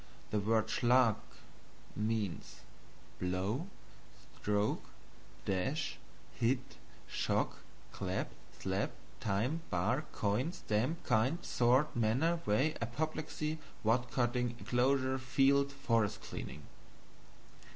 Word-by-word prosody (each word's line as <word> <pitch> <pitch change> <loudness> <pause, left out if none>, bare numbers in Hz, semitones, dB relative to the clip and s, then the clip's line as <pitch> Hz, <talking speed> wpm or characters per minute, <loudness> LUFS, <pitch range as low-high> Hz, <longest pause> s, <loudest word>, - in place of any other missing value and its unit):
The 105 - +2
word 110 +1 +2
SCHLAG 120 0 +4 0.8
means 105 -3 -2 0.6
Blow, 95 - -1 0.7
Stroke, 105 0 +1 0.6
Dash, 130 - -1 0.3
Hit, 130 +3 0 0.3
Shock, - - 0 0.3
Clap, - - -2 0.3
Slap, - - -1 0.3
Time, 115 +10 0
Bar, 115 - +1
Coin, 110 +11 0
Stamp, 140 +4 -1
Kind, 125 +9 +2
Sort, 130 +5 +3
Manner, 130 +10 +2
Way, 130 +10 +3
Apoplexy, 155 +5 -2 0.2
Wood 120 +3 +2
cutting, 120 -1 +1
Enclosure, 130 +1 +2
Field, 140 +2 +3
Forest 115 -6 +1
clearing. - - -6
125 Hz, 90 wpm, -34 LUFS, 110-140 Hz, 0.8 s, SCHLAG